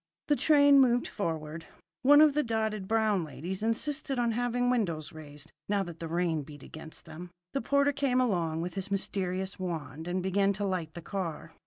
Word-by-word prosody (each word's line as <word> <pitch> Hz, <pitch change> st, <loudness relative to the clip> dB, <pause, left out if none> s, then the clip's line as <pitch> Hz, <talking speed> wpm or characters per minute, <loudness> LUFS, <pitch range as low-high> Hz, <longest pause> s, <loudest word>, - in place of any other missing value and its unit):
The 295 Hz, -, +5 dB
train 285 Hz, -2 st, +6 dB
moved 245 Hz, -2 st, +4 dB
forward. 160 Hz, -4 st, -4 dB, 0.3 s
One 290 Hz, +3 st, +7 dB
of 305 Hz, -2 st, +6 dB
the 300 Hz, -, +2 dB
dotted 220 Hz, -5 st, -2 dB
brown 215 Hz, -4 st, +2 dB
ladies 175 Hz, +5 st, -6 dB
insisted 270 Hz, +5 st, -1 dB
on 240 Hz, -1 st, +2 dB
having 245 Hz, +1 st, 0 dB
windows 170 Hz, -11 st, -1 dB
raised, 150 Hz, -1 st, -9 dB, 0.2 s
now 200 Hz, -1 st, +2 dB
that 170 Hz, -3 st, -9 dB
the 165 Hz, -, -4 dB
rain 165 Hz, -1 st, 0 dB
beat 145 Hz, 0 st, -11 dB
against 160 Hz, 0 st, -10 dB
them. 170 Hz, +2 st, -9 dB, 0.2 s
The 275 Hz, -, 0 dB
porter 280 Hz, 0 st, +2 dB
came 270 Hz, -2 st, +1 dB
along 170 Hz, -10 st, 0 dB
with 175 Hz, +1 st, -4 dB
his 195 Hz, 0 st, -4 dB
mysterious 190 Hz, -1 st, -2 dB
wand 160 Hz, -3 st, -5 dB
and 180 Hz, +1 st, -1 dB
began 195 Hz, +1 st, +2 dB
to 200 Hz, +1 st, -3 dB
light 180 Hz, -5 st, -3 dB
the 170 Hz, -, -7 dB
car. 165 Hz, -4 st, -5 dB
190 Hz, 185 wpm, -30 LUFS, 165-245 Hz, 0.3 s, One